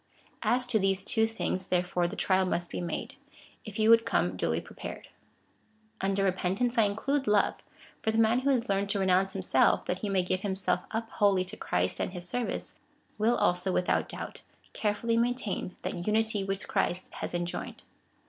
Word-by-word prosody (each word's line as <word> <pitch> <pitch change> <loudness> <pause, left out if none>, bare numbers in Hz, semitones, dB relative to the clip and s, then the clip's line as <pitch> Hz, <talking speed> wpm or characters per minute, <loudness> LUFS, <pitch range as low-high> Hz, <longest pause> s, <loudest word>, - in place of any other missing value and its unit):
As 250 +1 +2
to 245 -3 +1
these 195 -1 +1
two 225 +1 +3
things, 190 -4 -3
tlierefore, 180 -1 +1
the - - -6
trial 190 0 +2
must 175 -1 -1
be - - -3
made, 175 - -4 0.5
if 215 -2 -7
you 220 +1 +5
would 230 0 +7
come 90 - +1
duly 80 -2 0
prepared. - - -9 0.9
Under 195 0 +1
repentance 195 +6 0
I 225 - +5
include 270 +8 -1
love: 210 -1 +3 0.4
for 220 - 0
the 220 - +1
man 225 +2 +4
Avho 275 - +1
has 250 -3 +2
learned 200 0 0
to 200 - 0
renounce 190 0 +2
himself, 190 -1 +2
that 180 - -2
he 210 - -3
may 190 -2 +2
give 185 +1 0
him 195 -2 -1
self 180 -2 -1
\vjy 225 +1 -3
wholly 200 -4 +2
to 185 - -6
Christ 90 +1 0
and - - -2
his 175 -1 -5
service, 245 +8 -3 0.4
will 225 +3 +3
also, 180 +2 +2
without 180 0 +1
doubt, - - -7 0.3
carefully 230 +2 0
maintain 235 -6 -1
that 175 +1 -4
unity 220 -1 +2
which 195 0 -3
Christ 180 +1 -1
has - - -4
en 175 0 0
joined. 175 - -6
195 Hz, 185 wpm, -29 LUFS, 180-225 Hz, 0.9 s, would